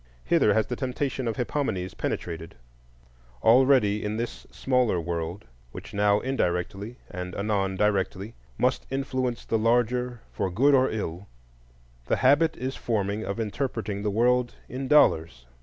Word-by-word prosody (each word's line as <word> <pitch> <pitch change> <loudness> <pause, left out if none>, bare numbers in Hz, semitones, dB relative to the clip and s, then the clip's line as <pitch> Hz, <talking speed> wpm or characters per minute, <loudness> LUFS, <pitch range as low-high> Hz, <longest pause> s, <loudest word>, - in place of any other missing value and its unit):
Hither - - +3
has 110 -1 +3
the 125 - -4
temptation 130 0 -2
of 115 - -1
Hippomenes 110 -8 -2
penetrated; 80 -1 -4 0.9
already 115 -4 +5
in 105 +1 -2
this 120 +1 -5
smaller 125 -8 +1
world, 85 +3 -4 0.3
which - - -9
now 100 0 +3
indirectly 100 -3 -2 0.2
and 90 0 -6
anon 100 -2 0
directly 100 +1 0 0.2
must - - 0
influence 130 -2 -2
the 115 - 0
larger 120 +1 +1
for 95 - -2
good 130 +11 +3
or 130 -1 +4
ill, 100 -3 -4 0.8
the - - +2
habit 150 +5 +3
is 130 +1 -3
forming 105 -2 -1
of 100 +2 -4
interpreting 110 -2 -3
the 105 - 0
world 120 +3 +2
in 130 +2 -5
dollars. 80 - +3
110 Hz, 140 wpm, -26 LUFS, 100-125 Hz, 0.9 s, already